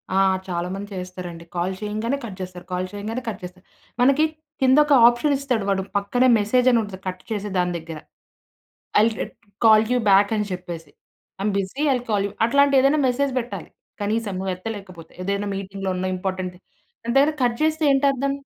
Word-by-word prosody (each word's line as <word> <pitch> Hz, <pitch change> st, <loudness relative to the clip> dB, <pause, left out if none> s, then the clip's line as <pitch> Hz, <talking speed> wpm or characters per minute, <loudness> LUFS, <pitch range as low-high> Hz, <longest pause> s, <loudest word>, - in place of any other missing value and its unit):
ఆ! -, -, +4 dB, 0.3 s
చాలామంది 185 Hz, +3 st, -4 dB
చేస్తారండి. 180 Hz, -2 st, -7 dB
కాల్ 175 Hz, +2 st, -1 dB
చేయంగానే 215 Hz, +6 st, -2 dB
కట్ 195 Hz, -5 st, -8 dB
చేస్తారు. 180 Hz, -1 st, -7 dB
కాల్ 180 Hz, +1 st, -1 dB
చేయంగానే 215 Hz, +5 st, -4 dB
కట్ 205 Hz, -, -6 dB
చేస్తారు. 180 Hz, +1 st, -10 dB, 0.4 s
మనకి 275 Hz, +5 st, +5 dB, 0.4 s
కిందొక 285 Hz, +3 st, +5 dB, 0.2 s
ఆప్షనిస్తాడు, 260 Hz, -1 st, +1 dB
వాడు 195 Hz, -1 st, +1 dB, 0.2 s
పక్కనే 245 Hz, +6 st, +2 dB
మెసేజ్ 250 Hz, +5 st, +2 dB
అని 235 Hz, -, +4 dB
ఉంటుంది. 190 Hz, -2 st, -8 dB
కట్ 185 Hz, 0 st, -5 dB
చేసే 210 Hz, -1 st, -2 dB
దాని 180 Hz, 0 st, +1 dB
దగ్గర 165 Hz, -1 st, -8 dB, 1.0 s
ఐ -, -, +6 dB
విల్ 225 Hz, -1 st, -1 dB
రి -, -, -6 dB, 0.4 s
కాల్ 220 Hz, -1 st, +7 dB
యూ -, -, +3 dB
బ్యాకని 205 Hz, +2 st, +4 dB
చెప్పేసి. 170 Hz, -4 st, -7 dB, 0.5 s
I -, -, -5 dB
am 205 Hz, -1 st, 0 dB
busy, 195 Hz, +10 st, -4 dB
I -, -, +4 dB
will 245 Hz, -, -4 dB
call 200 Hz, -2 st, +2 dB
you -, -, -9 dB
అట్లాంటి 280 Hz, +3 st, +4 dB
ఏదైనా 280 Hz, +3 st, +3 dB
మెసేజ్ 270 Hz, +2 st, 0 dB
పెట్టాలి 240 Hz, 0 st, -6 dB, 0.3 s
కనీసం 215 Hz, 0 st, -1 dB
నువ్వు 190 Hz, 0 st, -2 dB
ఎత్తలేకపోతే. 185 Hz, -4 st, -8 dB
ఏదైనా 200 Hz, +1 st, -1 dB
మీటింగ్‌లో 195 Hz, 0 st, -4 dB
ఉన్న 185 Hz, +1 st, -1 dB
ఇంపార్టెంట్ 185 Hz, -1 st, -3 dB, 0.5 s
దాని 235 Hz, +2 st, -2 dB
దగ్గర 285 Hz, +3 st, +5 dB
కట్ 240 Hz, -1 st, +1 dB
చేస్తే 315 Hz, 0 st, +1 dB
ఏంటర్థం? 275 Hz, 0 st, +2 dB
205 Hz, 170 wpm, -23 LUFS, 185-250 Hz, 1.0 s, కాల్